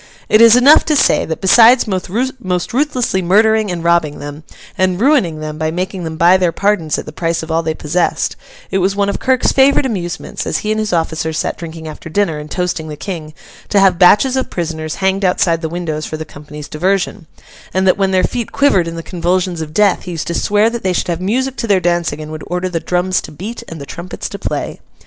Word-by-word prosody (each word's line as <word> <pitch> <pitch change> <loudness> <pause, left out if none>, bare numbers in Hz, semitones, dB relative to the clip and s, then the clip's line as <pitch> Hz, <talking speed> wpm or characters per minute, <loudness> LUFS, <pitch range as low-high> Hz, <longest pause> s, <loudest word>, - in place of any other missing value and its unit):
It 215 - +5
is 230 0 +8
enough 270 +5 +6
to 310 - +1
say, - - +3
that 160 - -5
besides 230 +6 +6
most 195 0 -2
ruthlessly 255 -8 0
murdering 215 +4 +3
and 175 -2 -4
robbing 170 -3 +1
them, 145 +1 -8 0.3
and 185 -1 0
ruining 220 - +2
them 155 0 -6
by 155 0 0
making 185 +2 -4
them 160 0 -5
buy 175 +3 +5
their 180 -2 +1
pardons 185 -3 0
at - - -5
the - - -8
price 165 +1 -2
of 160 - -6
all 165 +1 +1
they 160 -1 -2
possessed, 155 +4 -1 0.4
it 195 - +1
was 190 +2 +1
one 200 0 +1
of - - -3
Kirk's 260 -1 +2
favourite 275 +1 +4
amusements, 180 -8 -4
as - - 0
he 215 - 0
and 215 - 0
his 215 -1 -2
officers 160 -2 -1
sat - - -1
drinking 165 -1 -8
after 155 +1 -9
dinner, 165 -3 0
and 150 0 -9
toasting 180 -3 -2
the 150 -1 -7
King, 160 -5 -6 0.3
to 205 - +3
have 190 -3 +4
batches 210 +8 +5
of 260 - -1
prisoners 160 -3 -4
hanged 190 +1 0
outside 170 -2 +1
the 160 - -3
windows 160 -3 -4
for 155 - -5
the 160 - -6
company's 150 0 -10
diversion; 185 +1 -1 0.4
and 190 0 0
that 185 +1 +3
when 195 -1 +2
their 185 -1 +2
feet 235 +4 -2
quivered 195 -12 +2
in 165 - -5
the 165 - -6
convulsions 180 0 -1
of 155 -1 -6
death, 200 +3 +2
he 180 - -5
used 165 - -4
to 170 - -3
swear 210 +5 +2
that 235 -1 -4
they 185 -1 0
should 180 - -2
have 170 0 -2
music 255 +7 -1
to 230 - -3
their 200 -3 +3
dancing, 175 -3 -1
and 155 0 -7
would 155 -1 -7
order 180 +1 -2
the 170 -2 -2
drums 180 +2 0
to - - -10
beat 200 +10 -7
and 165 - -8
the 140 - -7
trumpets 170 +5 -7
to - - -8
play. - - -4
180 Hz, 230 wpm, -16 LUFS, 160-205 Hz, 0.4 s, is